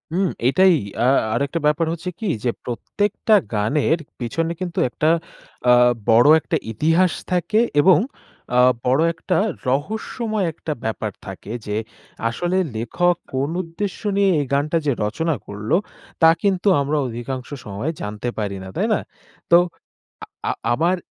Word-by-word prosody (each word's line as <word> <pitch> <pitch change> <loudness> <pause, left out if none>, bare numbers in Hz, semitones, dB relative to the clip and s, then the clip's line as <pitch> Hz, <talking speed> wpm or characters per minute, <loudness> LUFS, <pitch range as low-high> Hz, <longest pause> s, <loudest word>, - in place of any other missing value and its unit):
উম 190 0 +2 0.2
এটাই 185 +4 +5 0.3
আ - - +4 0.3
আরেকটা 140 +7 -1
ব্যাপার 150 +2 +2
হচ্ছে 170 +2 -5
কী 220 - -3 0.2
যে 120 - +2
প্রত্যেকটা 205 - 0 0.2
গানের 140 +10 +1 0.2
পিছনে 165 +8 -2
কিন্তু 175 -2 -3
একটা 155 +5 0 0.6
আ - - +8 0.4
বড় 115 +4 +6
একটা - - -1
ইতিহাস 165 - +2 0.2
থাকে 180 +4 +1 0.2
এবং 175 -1 +6 0.6
আ - - +6 0.3
বড় 130 +4 +3
একটা 175 +3 -1 0.3
রহস্যময় 215 - -1
একটা 155 0 -4
ব্যাপার 110 -1 -2
থাকে 95 +2 -8
যে 105 0 -2 0.5
আসলে 175 +10 -1 0.2
লেখক 175 +11 +1 0.2
কোন 135 +3 0
উদ্দেশ্য 180 +3 -5 0.2
নিয়ে 200 -1 +4
এই 145 - 0
গানটা 145 +4 +1
যে 140 - +3
রচনা 160 +9 -1
করল 105 +5 -6 0.5
তা 160 - +8
কিন্তু 195 -1 +1
আমরা 145 +2 0
অধিকাংশ 125 +2 -5 0.2
সময় 105 +10 -3
জানতে 105 +3 -4
পারি 100 -2 -2
না - - -8
তাই - - +1
না? - - +2 0.5
তো 170 - +9 0.7
আ - - -19 0.2
আ - - +2 0.2
আমার 170 +8 +2
155 Hz, 145 wpm, -21 LUFS, 120-180 Hz, 0.7 s, তো